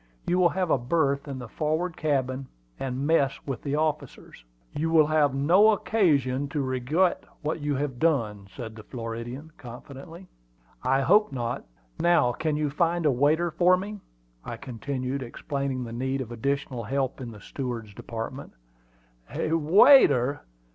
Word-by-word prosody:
"You 180 Hz, -, +1 dB
will 175 Hz, -1 st, +5 dB
have 180 Hz, -2 st, -1 dB
a -, -, +3 dB
berth 140 Hz, +2 st, 0 dB
in 140 Hz, -2 st, -5 dB
the 125 Hz, -2 st, -7 dB
forward 160 Hz, +7 st, -2 dB
cabin, 135 Hz, -3 st, -1 dB, 0.3 s
and 130 Hz, +1 st, -3 dB
mess 145 Hz, -3 st, +2 dB
with 135 Hz, -3 st, -4 dB
the 145 Hz, 0 st, -2 dB
officers." 150 Hz, -, -3 dB, 0.3 s
"You 160 Hz, +2 st, -1 dB
will 160 Hz, -2 st, +5 dB
have 150 Hz, -3 st, +2 dB
no 175 Hz, +10 st, +5 dB
occasion 145 Hz, -, +1 dB
to 145 Hz, 0 st, -2 dB
regret 135 Hz, +8 st, +1 dB, 0.2 s
what 155 Hz, +1 st, -2 dB
you 145 Hz, -1 st, -1 dB
have 135 Hz, -3 st, -3 dB
done," 110 Hz, -11 st, 0 dB
said 110 Hz, +2 st, -8 dB
the 110 Hz, -, -9 dB
Floridian, 120 Hz, +6 st, -7 dB
confidently. 140 Hz, +8 st, -11 dB, 0.5 s
"I 135 Hz, +1 st, +2 dB
hope 205 Hz, +5 st, +4 dB
not. 120 Hz, -3 st, -3 dB, 0.3 s
Now, 170 Hz, -8 st, +4 dB
can 155 Hz, +4 st, -2 dB
you 150 Hz, -2 st, -1 dB
find 170 Hz, +2 st, 0 dB
a 150 Hz, -, +5 dB
waiter 155 Hz, +7 st, +2 dB
for 180 Hz, +3 st, +4 dB
me?" 205 Hz, +3 st, -6 dB, 0.4 s
I -, -, -6 dB
continued, 130 Hz, +2 st, -4 dB
explaining 135 Hz, +1 st, -3 dB
the 115 Hz, -1 st, -7 dB
need 130 Hz, +3 st, -2 dB
of 125 Hz, -3 st, -5 dB
additional 135 Hz, 0 st, -2 dB
help 135 Hz, +2 st, -2 dB
in 125 Hz, -, -5 dB
the 110 Hz, -2 st, -11 dB
steward's 115 Hz, -2 st, -6 dB
department. 115 Hz, +6 st, -7 dB, 0.8 s
"A 160 Hz, -, -2 dB
waiter! 165 Hz, -, +5 dB
140 Hz, 155 wpm, -26 LUFS, 125-160 Hz, 0.8 s, will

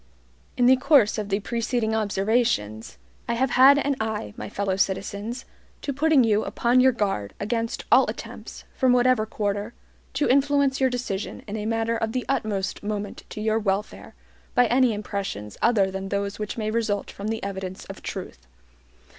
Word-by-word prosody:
In 245 Hz, -, +3 dB
the 260 Hz, +1 st, +6 dB
course 255 Hz, -6 st, +4 dB
of 205 Hz, -1 st, -4 dB
the 200 Hz, 0 st, +1 dB
preceding 230 Hz, 0 st, -1 dB
observations, 205 Hz, -, 0 dB, 0.3 s
I 235 Hz, -, +1 dB
have 255 Hz, +1 st, +1 dB
had 270 Hz, +3 st, +7 dB
an 285 Hz, -1 st, +1 dB
eye, 215 Hz, -, -3 dB
my 105 Hz, -, -7 dB
fellow 195 Hz, -1 st, -1 dB
citizens, 200 Hz, +5 st, -2 dB, 0.4 s
to 280 Hz, -, -2 dB
putting 295 Hz, -1 st, +4 dB
you 215 Hz, -2 st, +2 dB
upon 240 Hz, +2 st, +2 dB
your 260 Hz, +1 st, +6 dB
guard 195 Hz, -, -2 dB
against 230 Hz, +2 st, -2 dB
all -, -, +6 dB
attempts, -, -, -8 dB
from 255 Hz, -1 st, +3 dB
whatever 245 Hz, -3 st, +3 dB
quarter, 205 Hz, +1 st, -3 dB, 0.4 s
to 295 Hz, -, +1 dB
influence 280 Hz, 0 st, +2 dB
your 260 Hz, -, +4 dB
decision 240 Hz, -5 st, -4 dB
in 205 Hz, -, -5 dB
a 215 Hz, 0 st, -3 dB
matter 225 Hz, 0 st, 0 dB
of 225 Hz, 0 st, -2 dB
the 255 Hz, -, -2 dB
utmost 215 Hz, -7 st, -2 dB
moment 205 Hz, -1 st, -5 dB
to 215 Hz, -, -6 dB
your 220 Hz, +1 st, +1 dB
welfare, 205 Hz, 0 st, -3 dB, 0.4 s
by 245 Hz, -1 st, +5 dB
any 245 Hz, +1 st, +3 dB
impressions 200 Hz, -, -4 dB
other 200 Hz, -5 st, +3 dB
than 190 Hz, 0 st, -5 dB
those 200 Hz, 0 st, -2 dB
which 210 Hz, +1 st, -4 dB
may 215 Hz, -1 st, -2 dB
result 215 Hz, -3 st, -1 dB
from 200 Hz, -, -6 dB
the 225 Hz, 0 st, -3 dB
evidence 190 Hz, -1 st, -5 dB
of -, -, -9 dB
truth. -, -, -7 dB
220 Hz, 170 wpm, -25 LUFS, 200-245 Hz, 0.4 s, had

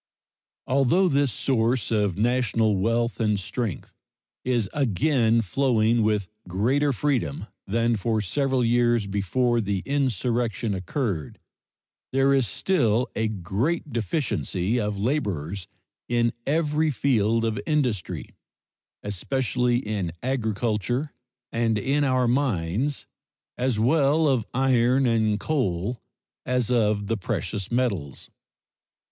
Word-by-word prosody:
Although 140 Hz, +8 st, +3 dB
this 140 Hz, -3 st, +2 dB
source 115 Hz, 0 st, 0 dB
of 105 Hz, -5 st, +1 dB
national 115 Hz, -2 st, +2 dB
wealth 115 Hz, +5 st, 0 dB
and 105 Hz, -3 st, +1 dB
strength 100 Hz, -, -4 dB, 0.5 s
is 120 Hz, -5 st, +1 dB
again 120 Hz, -, +2 dB
flowing 115 Hz, +1 st, +2 dB
with 105 Hz, -3 st, +1 dB, 0.2 s
greater 130 Hz, +11 st, +1 dB
freedom 125 Hz, -, -1 dB, 0.2 s
than 115 Hz, +3 st, +1 dB
for 110 Hz, +2 st, 0 dB
several 130 Hz, +5 st, 0 dB
years 120 Hz, -2 st, +2 dB
before 115 Hz, +5 st, 0 dB
the 100 Hz, -2 st, -2 dB
insurrection 120 Hz, -5 st, 0 dB
occurred, 95 Hz, -, -3 dB, 0.7 s
there 135 Hz, +1 st, +3 dB
is 135 Hz, -4 st, +2 dB
still 120 Hz, -, +1 dB
a 110 Hz, -, 0 dB
great 110 Hz, -, -2 dB
deficiency 115 Hz, -, -1 dB
of 105 Hz, -2 st, -2 dB
laborers 100 Hz, -, -2 dB, 0.4 s
in 120 Hz, -1 st, +2 dB
every 155 Hz, +1 st, +1 dB
field 115 Hz, -5 st, +1 dB
of 110 Hz, -2 st, -1 dB
industry, 125 Hz, -, -1 dB, 0.7 s
especially 125 Hz, +4 st, 0 dB
in 100 Hz, -6 st, -2 dB
agriculture 120 Hz, +2 st, -1 dB, 0.4 s
and 115 Hz, -1 st, +1 dB
in 140 Hz, +6 st, +1 dB
our 130 Hz, -2 st, +2 dB
mines, 120 Hz, -, 0 dB, 0.5 s
as 125 Hz, -3 st, 0 dB
well 145 Hz, +5 st, +3 dB
of 130 Hz, -6 st, +1 dB
iron 130 Hz, 0 st, +3 dB
and 110 Hz, -3 st, +2 dB
coal 115 Hz, -, -1 dB, 0.4 s
as 125 Hz, -2 st, 0 dB
of 105 Hz, -4 st, +2 dB
the 115 Hz, +2 st, -1 dB
precious 100 Hz, +1 st, -3 dB
metals. 100 Hz, -, -2 dB
115 Hz, 110 wpm, -25 LUFS, 105-130 Hz, 0.7 s, Although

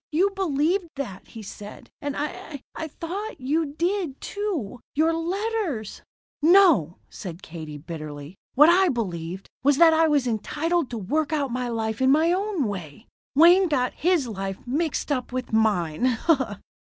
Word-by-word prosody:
You 370 Hz, +6 st, +2 dB
believed 355 Hz, 0 st, 0 dB
that, 240 Hz, -10 st, -6 dB
he 225 Hz, -, -10 dB
said. 205 Hz, +1 st, -10 dB
And 285 Hz, -1 st, -3 dB
I 290 Hz, -1 st, -5 dB
I 320 Hz, -, -5 dB
thought 370 Hz, +8 st, -6 dB
you 300 Hz, +5 st, 0 dB
did, 345 Hz, -4 st, -1 dB
too. 350 Hz, -, -4 dB, 0.2 s
Your 320 Hz, +3 st, +3 dB
letters 350 Hz, -, -2 dB, 0.2 s
" -, -, -97 dB
"No," 320 Hz, -, +5 dB
said 180 Hz, -1 st, -9 dB
Katie 155 Hz, -3 st, -8 dB
bitterly, 150 Hz, -1 st, -8 dB, 0.2 s
"what 295 Hz, +3 st, +8 dB
I 365 Hz, +2 st, +5 dB
believed 185 Hz, -6 st, -4 dB
was 285 Hz, +1 st, +3 dB
that 330 Hz, 0 st, +7 dB
I 320 Hz, 0 st, +4 dB
was 290 Hz, -4 st, +2 dB
entitled 300 Hz, -, -1 dB
to 235 Hz, -, -5 dB
work 285 Hz, +10 st, -1 dB
out 285 Hz, -4 st, 0 dB
my 250 Hz, 0 st, -2 dB
life 220 Hz, 0 st, -2 dB
in 260 Hz, -, +4 dB
my 315 Hz, +5 st, +4 dB
own 390 Hz, -4 st, -1 dB
way. 200 Hz, -, -6 dB, 0.3 s
Wayne 350 Hz, +5 st, +7 dB
got 255 Hz, -5 st, 0 dB
his 340 Hz, -6 st, +1 dB
life 195 Hz, -3 st, -4 dB
mixed 300 Hz, +4 st, -1 dB
up 255 Hz, -3 st, -1 dB
with 255 Hz, -2 st, -4 dB
mine." 220 Hz, +1 st, +2 dB
280 Hz, 155 wpm, -25 LUFS, 215-335 Hz, 0.3 s, what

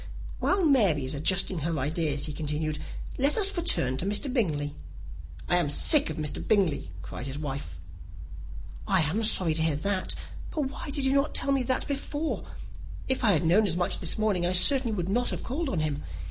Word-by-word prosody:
"While 380 Hz, -2 st, +1 dB
Mary 200 Hz, -, +3 dB
is 130 Hz, -, -3 dB
adjusting 180 Hz, +4 st, +1 dB
her 160 Hz, +1 st, -2 dB
ideas," 145 Hz, +1 st, -1 dB
he 150 Hz, -, -4 dB
continued, 150 Hz, 0 st, -3 dB, 0.4 s
"let 280 Hz, +3 st, +2 dB
us 400 Hz, -2 st, +2 dB
return 130 Hz, -, +1 dB
to 170 Hz, -, -3 dB
Mr. 230 Hz, +6 st, -1 dB
Bingley." 150 Hz, -, -1 dB, 0.7 s
"I 175 Hz, -, +3 dB
am 170 Hz, -5 st, +1 dB
sick 295 Hz, -, +4 dB
of 155 Hz, -, -5 dB
Mr. 150 Hz, -2 st, -3 dB
Bingley," 185 Hz, -, 0 dB
cried 120 Hz, +9 st, -7 dB
his 135 Hz, +1 st, -5 dB
wife. 135 Hz, -, -6 dB, 1.1 s
"I 190 Hz, -3 st, +4 dB
am 170 Hz, +9 st, 0 dB
sorry 185 Hz, -6 st, +3 dB
to 160 Hz, -, -1 dB
hear 160 Hz, -2 st, +1 dB
that; 190 Hz, +4 st, -1 dB, 0.3 s
but 310 Hz, -, -3 dB
why 280 Hz, -, -8 dB
did 280 Hz, -1 st, -2 dB
you 265 Hz, -, +2 dB
not 280 Hz, +2 st, +1 dB
tell 275 Hz, -, +1 dB
me 270 Hz, -2 st, +1 dB
so 255 Hz, +1 st, +1 dB
before? 290 Hz, +2 st, -3 dB, 0.6 s
If 260 Hz, 0 st, -1 dB
I 210 Hz, -4 st, +5 dB
had 165 Hz, 0 st, +1 dB
known 200 Hz, +6 st, +4 dB
as 170 Hz, -2 st, -1 dB
much 175 Hz, -, 0 dB
this -, -, 0 dB
morning, 210 Hz, -5 st, 0 dB
I 175 Hz, +1 st, +1 dB
certainly 240 Hz, +4 st, +6 dB
would 175 Hz, -3 st, -3 dB
not 245 Hz, +6 st, 0 dB
have -, -, -4 dB
called 290 Hz, +4 st, -3 dB
on 170 Hz, -, -1 dB
him. 150 Hz, -1 st, -2 dB
180 Hz, 200 wpm, -27 LUFS, -, 1.1 s, certainly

